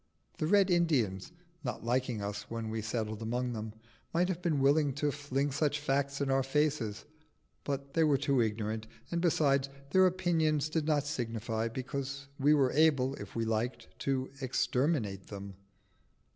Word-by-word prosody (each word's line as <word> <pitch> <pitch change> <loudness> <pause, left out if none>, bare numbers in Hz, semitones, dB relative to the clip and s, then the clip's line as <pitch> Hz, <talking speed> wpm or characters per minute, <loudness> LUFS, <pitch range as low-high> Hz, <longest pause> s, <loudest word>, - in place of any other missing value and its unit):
The 155 - 0
Red 195 0 +4
Indians, 140 - +1 0.3
not 125 -5 -4
liking 125 -3 0
us 105 +1 -5
when 115 -1 -4
we 110 0 -2
settled 110 0 -3
among 120 +2 -1
them, 110 -1 -5 0.4
might 180 +2 +3
have 180 -2 -2
been 165 -5 +1
willing 140 +1 +3
to 145 +2 0
fling 140 0 -1
such 150 +1 +1
facts 140 -1 0
in 140 -1 0
our 135 0 +3
faces, 135 -6 0 0.6
but 140 -1 -4
they 165 - +3
were 150 -3 +4
too 135 -1 +2
ignorant, 110 0 -2 0.2
and 170 0 0
besides, 140 -5 +2 0.2
their 185 +2 +6
opinions 160 -5 +1
did 155 -1 -1
not 145 -2 +2
signify, 115 -5 -2
because 140 +3 -4
we 145 +2 +5
were 135 -3 +3
able, 145 -4 +3
if - - -9
we 115 -1 0
liked, 115 +3 -2
to 135 -1 -1
exterminate 125 - 0
them. 100 -1 -7
135 Hz, 160 wpm, -32 LUFS, 115-150 Hz, 0.6 s, their